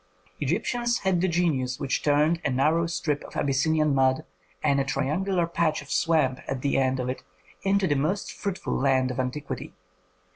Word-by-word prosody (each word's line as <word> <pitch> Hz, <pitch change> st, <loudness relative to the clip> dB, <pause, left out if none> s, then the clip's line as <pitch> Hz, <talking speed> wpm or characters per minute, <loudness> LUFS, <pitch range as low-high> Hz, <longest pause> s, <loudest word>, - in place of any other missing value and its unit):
Egyptians 235 Hz, -, 0 dB
had 190 Hz, -3 st, +1 dB
the 190 Hz, -, +2 dB
genius 155 Hz, -8 st, 0 dB
which 135 Hz, -, -1 dB
turned 150 Hz, +3 st, +2 dB
a -, -, +1 dB
narrow 155 Hz, +6 st, +2 dB
strip 150 Hz, -3 st, -2 dB
of -, -, -12 dB
Abyssinian 150 Hz, +2 st, +2 dB
mud 130 Hz, -1 st, +2 dB, 0.4 s
and 140 Hz, -2 st, +3 dB
a -, -, +2 dB
triangular 170 Hz, +6 st, 0 dB
patch 165 Hz, -3 st, 0 dB
of 140 Hz, -, -12 dB
swamp 150 Hz, -6 st, +2 dB
at 130 Hz, -1 st, -3 dB
the 140 Hz, -, +1 dB
end 130 Hz, 0 st, +1 dB
of 125 Hz, -, -2 dB
it 130 Hz, -, -3 dB, 0.4 s
into 195 Hz, 0 st, +2 dB
the 155 Hz, -, +2 dB
most 155 Hz, +9 st, -1 dB
fruitful 200 Hz, -2 st, -4 dB
land 130 Hz, -1 st, +2 dB
of 125 Hz, -, -5 dB
antiquity. 130 Hz, +3 st, -4 dB
150 Hz, 175 wpm, -26 LUFS, 135-170 Hz, 0.4 s, and